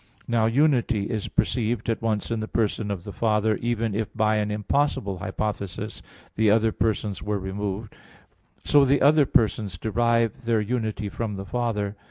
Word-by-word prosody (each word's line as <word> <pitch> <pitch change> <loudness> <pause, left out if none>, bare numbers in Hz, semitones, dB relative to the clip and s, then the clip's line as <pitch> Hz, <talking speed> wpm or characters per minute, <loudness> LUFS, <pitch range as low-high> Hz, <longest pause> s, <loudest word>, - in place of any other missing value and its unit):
Now 115 -2 +2
"unity" 125 -4 +2
is 110 -3 -2
perceived 115 -2 0
at 115 0 -1
once 110 -1 -1
in 115 - 0
the 110 - -3
person 110 -1 -1
of 95 -4 -3
the 100 - -8
Father, 110 -1 +1
even 115 -2 -1
if 105 0 -2
by 110 -1 +2
an 105 0 0
impossible 105 -2 0
hypothesis, 100 +1 -4 0.3
the 110 -1 +3
other 110 +1 +4
persons 105 -3 -1
were 105 0 -1
removed. 100 +2 -4 0.7
So 145 -1 +5
the 140 +1 +3
other 145 0 +5
persons 105 -6 +1
derive 115 +3 0
their 115 -1 +2
unity 110 -1 -2
from 105 0 -4
the 95 0 -6
Father. 105 -4 -2
110 Hz, 165 wpm, -25 LUFS, 105-115 Hz, 0.7 s, So